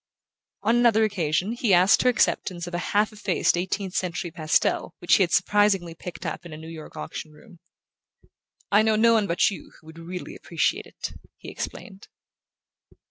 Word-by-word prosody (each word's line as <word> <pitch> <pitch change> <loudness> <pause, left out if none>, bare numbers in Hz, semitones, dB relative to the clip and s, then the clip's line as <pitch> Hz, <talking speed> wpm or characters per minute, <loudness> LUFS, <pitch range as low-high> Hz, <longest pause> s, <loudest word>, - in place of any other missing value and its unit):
On 225 +3 +3
another 230 -2 +4
occasion 180 -2 0
he 235 -5 +2
asked 185 +3 +5
her 250 - +4
acceptance 185 -6 0
of 175 - -9
a 175 - -1 0.2
half 215 +1 +2
effaced 205 -5 +1
eighteenth 190 +1 -3
century 175 -2 -2
pastel 155 -2 0
which 175 - +1
he - - +1
had 175 - +2
surprisingly 200 -5 +2
picked 175 +1 -9
up - - -4
in 170 - -11
a 155 - -8
New 160 +1 -10
York 160 -2 -10
auction 75 - -7
room. 165 +3 -18 1.1
"I 205 +1 +6
know 220 0 +2
no 230 +2 +5
one 215 -3 +2
but 170 +2 +2
you 195 - -10
who 155 - -25
would 160 +1 -12
really 180 +2 -7
appreciate 360 - -1
it," - - -7 0.2
he - - -10
explained. 195 -1 -8
185 Hz, 180 wpm, -25 LUFS, 170-215 Hz, 1.1 s, I